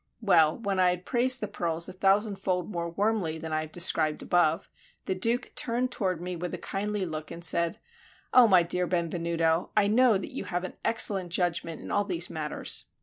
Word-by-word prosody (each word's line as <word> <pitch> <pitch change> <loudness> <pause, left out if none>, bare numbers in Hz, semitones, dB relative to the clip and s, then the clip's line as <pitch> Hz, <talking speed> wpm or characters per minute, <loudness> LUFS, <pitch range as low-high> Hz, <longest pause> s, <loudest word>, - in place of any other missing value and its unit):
Well, 165 -8 +3
when 200 -4 -2
I 180 -1 +5
had 180 0 -3
praised 255 +1 +2
the 210 - -2
pearls 170 -4 -2
a 185 - -8
thousandfold 195 -1 0
more 170 -2 -3
warmly 200 -3 -1
than 160 0 -6
I 155 - 0
have 155 0 -8
described 160 -3 +2
above, 175 0 +1 0.4
the - - -1
Duke 230 +7 -1
turned 245 +1 0
toward 185 -7 -2
me 180 +1 -5
with 175 +1 -4
a - - -7
kindly 205 0 -3
look, 155 -2 -6
and 170 +1 -5
said, 170 0 +1 0.6
"O 250 -2 +7
my 185 -4 +5
dear 180 +1 -1
Benvenuto, 170 -1 0
I 210 - +5
know 230 0 +4
that 190 - -7
you - - -5
have 175 0 -3
an 185 - -5
excellent 195 -5 +2
judgment 170 -2 -1
in - - -8
all 205 - +2
these 180 -3 -1
matters. 155 -1 -1
180 Hz, 200 wpm, -27 LUFS, 170-205 Hz, 0.6 s, O